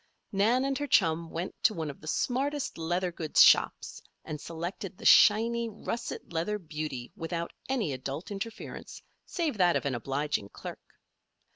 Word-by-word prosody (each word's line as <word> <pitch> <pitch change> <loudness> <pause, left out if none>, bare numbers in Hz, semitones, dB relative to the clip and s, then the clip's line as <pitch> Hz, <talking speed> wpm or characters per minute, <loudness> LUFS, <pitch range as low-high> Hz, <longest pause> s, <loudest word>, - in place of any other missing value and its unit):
Nan 225 +7 +3
and 275 0 -1
her 290 - -2
chum 165 - +3
went 170 +3 -4
to 215 - +3
one 160 -3 -3
of 140 - -17
the 155 - -11
smartest 275 - -1
leather 175 +2 -1
goods 160 -2 +4
shops - - +3 0.2
and 150 -2 -5
selected 175 +3 -6
the - - -11
shiny, 230 +2 +6
russet 220 -2 -5
leather 170 +6 -1
beauty 150 -8 -5
without 170 +1 -4 0.2
any 225 - 0
adult 135 +8 -5
interference 205 +3 -7 0.2
save 315 - -2
that 175 -2 +4
of - - 0
an 140 - 0
obliging 135 -2 -2
clerk. - - -10
175 Hz, 155 wpm, -29 LUFS, 155-225 Hz, 0.2 s, shiny